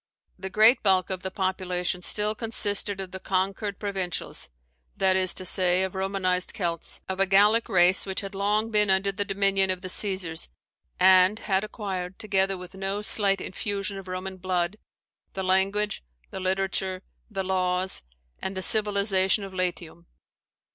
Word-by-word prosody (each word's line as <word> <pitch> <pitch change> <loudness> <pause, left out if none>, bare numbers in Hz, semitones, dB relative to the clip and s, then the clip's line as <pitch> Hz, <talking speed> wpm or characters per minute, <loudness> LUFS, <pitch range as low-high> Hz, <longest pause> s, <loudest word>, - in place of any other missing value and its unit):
The 190 - -5
great 220 +5 +5
bulk 190 -2 +2
of 185 -1 -4
the 190 - -4
population 185 -1 -2
still 210 +3 +3
consisted 205 -3 -1
of 190 -1 -6
the 190 - -7
conquered 195 +2 -2
provincials, 190 -4 -3 0.5
that 190 -1 +3
is 185 -1 +4
to 185 - -2
say, 180 0 +3
of 190 - -3
Romanized 190 -1 -1
Celts, 170 -3 -2
of 190 0 -4
a 195 - +3
Gallic 205 +4 +4
race 180 +1 +4
which 190 - -1
had 195 0 -7
long 210 +3 0
been 210 -2 +3
under 190 +1 +2
the 195 +1 -2
dominion 195 -1 +1
of 185 -1 -1
the 185 - -6
Caesars, 185 - +2 0.5
and 185 +2 +6
had 195 -3 -1
acquired, 190 -4 -5
together 195 -2 0
with 180 0 -11
no 195 +2 -3
slight 200 -2 +3
infusion 200 +1 -4
of 190 - -12
Roman 185 +1 -5
blood, 180 +1 -2 0.6
the 190 - -4
language, 195 - 0 0.3
the - - -6
literature, 190 0 -2 0.3
the 195 -3 -3
laws, 185 0 -1 0.4
and 190 0 -5
the 190 - -2
civilization 200 -2 +2
of 195 -1 -8
Latium. 175 -2 -4
190 Hz, 160 wpm, -26 LUFS, 185-200 Hz, 0.6 s, and